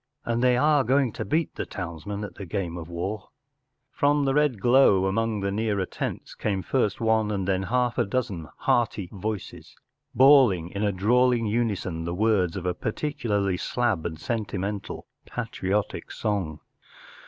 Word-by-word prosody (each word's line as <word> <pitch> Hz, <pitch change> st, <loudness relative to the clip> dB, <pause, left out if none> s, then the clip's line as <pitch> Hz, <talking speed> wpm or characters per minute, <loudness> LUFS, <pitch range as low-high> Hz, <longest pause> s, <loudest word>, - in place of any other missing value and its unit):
And 120 Hz, +1 st, 0 dB
they 125 Hz, -1 st, +4 dB
are 150 Hz, +1 st, +4 dB
going 130 Hz, 0 st, +2 dB
to -, -, -4 dB
beat 160 Hz, +2 st, 0 dB
the -, -, -4 dB
townsmen 100 Hz, +3 st, -5 dB
at 105 Hz, -, -6 dB
the 100 Hz, -, -8 dB
game 85 Hz, -2 st, -3 dB
of 85 Hz, -1 st, -7 dB
war! 95 Hz, +4 st, -4 dB, 0.3 s
”* 130 Hz, +1 st, -53 dB
From 145 Hz, 0 st, +3 dB
the 135 Hz, -, +2 dB
red 145 Hz, -6 st, +2 dB
glow 120 Hz, -5 st, +5 dB
among 110 Hz, +2 st, 0 dB
the 100 Hz, 0 st, -1 dB
nearer 105 Hz, -2 st, 0 dB
tents -, -, -5 dB
came 95 Hz, -3 st, -2 dB
first 105 Hz, 0 st, 0 dB
one 110 Hz, -2 st, +2 dB
and 95 Hz, -3 st, -2 dB
then 95 Hz, -1 st, +1 dB
half 125 Hz, +4 st, 0 dB
a -, -, +4 dB
dozen 100 Hz, -7 st, -3 dB
hearty 105 Hz, -6 st, 0 dB
voices, 105 Hz, 0 st, -6 dB, 0.4 s
bawling 130 Hz, -, +6 dB
in 100 Hz, -, -4 dB
a 105 Hz, -1 st, +2 dB
drawling 120 Hz, +5 st, +3 dB
unison 105 Hz, -7 st, -1 dB
the 85 Hz, +1 st, -3 dB
words 100 Hz, -4 st, +2 dB
of 90 Hz, -, -5 dB
a 90 Hz, -, +1 dB
particularly 105 Hz, -4 st, -1 dB
slab 110 Hz, -5 st, 0 dB
and 80 Hz, -2 st, -5 dB
sentimental 105 Hz, -2 st, -3 dB, 0.2 s
patriotic 100 Hz, +2 st, -3 dB
song. 95 Hz, -8 st, -2 dB
105 Hz, 165 wpm, -26 LUFS, 95-125 Hz, 0.4 s, bawling